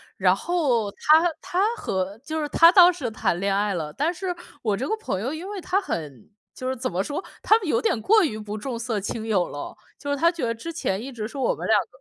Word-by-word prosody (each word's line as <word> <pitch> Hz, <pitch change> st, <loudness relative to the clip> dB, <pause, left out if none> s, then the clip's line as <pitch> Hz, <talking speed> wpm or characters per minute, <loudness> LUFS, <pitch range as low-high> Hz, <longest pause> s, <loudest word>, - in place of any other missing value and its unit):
然 185 Hz, -1 st, +4 dB
后 255 Hz, -, 0 dB
她 310 Hz, +9 st, +5 dB, 0.2 s
她 405 Hz, +6 st, 0 dB
和 190 Hz, -, -3 dB
就 315 Hz, +5 st, -4 dB
是 300 Hz, -, -1 dB
她 330 Hz, +3 st, +6 dB
当 360 Hz, -2 st, +8 dB
时 265 Hz, -9 st, -4 dB
谈 210 Hz, -5 st, 0 dB
恋 195 Hz, +2 st, 0 dB
爱 205 Hz, +1 st, +1 dB
了。 155 Hz, -4 st, -3 dB
但 305 Hz, -, -1 dB
是 365 Hz, +1 st, -3 dB, 0.3 s
我 210 Hz, -3 st, 0 dB
这 260 Hz, -, -3 dB
个 440 Hz, -, 0 dB
朋 435 Hz, -, -3 dB
友 250 Hz, +8 st, -3 dB
因 320 Hz, +3 st, -6 dB
为 410 Hz, -1 st, -5 dB
她 375 Hz, +2 st, 0 dB
很 150 Hz, -, -6 dB, 0.3 s
就 255 Hz, -, -4 dB
是 260 Hz, -, -1 dB
怎 255 Hz, +2 st, -2 dB
么 180 Hz, +2 st, -1 dB
说， 290 Hz, -, -4 dB, 0.2 s
她 435 Hz, -, +5 dB
们 395 Hz, -, -6 dB
有 235 Hz, -6 st, +2 dB
点 225 Hz, -, 0 dB
过 430 Hz, -, +5 dB
于 220 Hz, -10 st, -2 dB
不 210 Hz, 0 st, -6 dB
重 235 Hz, +1 st, -5 dB
色 230 Hz, -3 st, -2 dB
轻 220 Hz, +3 st, -4 dB
友 195 Hz, -5 st, +1 dB
了， 145 Hz, -, -7 dB, 0.2 s
就 285 Hz, -, -6 dB
是 285 Hz, -, +1 dB
她 335 Hz, +4 st, +3 dB
觉 335 Hz, -7 st, -3 dB
得 230 Hz, 0 st, -1 dB
之 330 Hz, +9 st, -6 dB
前 210 Hz, -12 st, -2 dB
一 270 Hz, -, -7 dB
直 220 Hz, -4 st, -5 dB
是 280 Hz, -, -10 dB
我 265 Hz, -, +1 dB
们 -, -, -5 dB
两 220 Hz, -, +5 dB
个 180 Hz, -, -10 dB
250 Hz, 280 characters per minute, -24 LUFS, 205-335 Hz, 0.3 s, 当